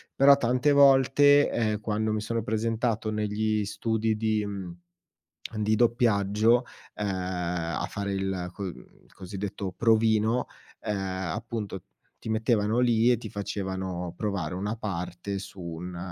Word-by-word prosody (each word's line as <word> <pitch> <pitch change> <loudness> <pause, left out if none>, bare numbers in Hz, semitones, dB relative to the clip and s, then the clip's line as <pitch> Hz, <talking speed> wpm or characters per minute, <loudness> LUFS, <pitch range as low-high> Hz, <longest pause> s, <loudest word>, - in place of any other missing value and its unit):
però 140 +1 +7
tante 125 +2 +2
volte, 140 +1 +6
ehm, 110 -2 0
quando 110 0 -1
mi 110 -1 -1
sono 115 +1 -2
presentato 110 0 -1
negli 105 0 0
studi 110 +1 -1
di 110 -1 0
mhmm, 95 -4 -6 0.8
di 105 0 +1
doppiaggio, 115 0 +3 0.3
ehm, 105 - -2
a 90 -3 -2
fare 100 -1 -3
il 95 -2 -2
co 100 - -6
mhmm, 95 - -3 0.4
l - - -27
cosiddetto 95 0 -5
provino, 110 +2 +2 0.3
ehm, 105 - -2 0.4
appunto 110 -4 -5 0.4
ti - - -9
mettevano 110 0 +1
lì 120 -1 +4
e 120 - +4
ti 110 -2 -8
facevano 95 -3 -4
provare 100 -7 -3
una 100 +4 -3
parte 95 -1 -4
su 95 -1 -9
un 85 +1 -6
105 Hz, 135 wpm, -27 LUFS, 95-115 Hz, 0.8 s, però